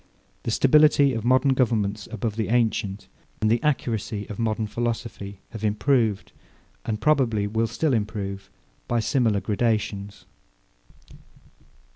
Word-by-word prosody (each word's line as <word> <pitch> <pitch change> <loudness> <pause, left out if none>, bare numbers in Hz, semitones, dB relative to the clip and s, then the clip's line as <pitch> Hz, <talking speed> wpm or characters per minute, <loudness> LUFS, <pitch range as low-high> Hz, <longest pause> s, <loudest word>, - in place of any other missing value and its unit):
The - - -4
stability 140 +2 +5
of 115 -2 -3
modern 130 +3 +3
governments 110 -5 0
above 110 -1 -3
the 110 -1 -1
ancient, 105 -4 0 0.3
and 110 0 +2
the 115 - +2
accuracy 115 -7 -1
of 105 - -7
modern 110 -1 0
philosophy, 115 -3 -4
have 110 -2 -8
improved, 110 0 +1 0.5
and 105 -1 -3
probably 120 -6 +2
will 110 +2 0
still 155 +4 0
improve, 100 -3 -3 0.4
by 120 - +1
similar 115 -3 +1
gradations. 105 -2 -2
110 Hz, 120 wpm, -24 LUFS, 105-120 Hz, 0.5 s, stability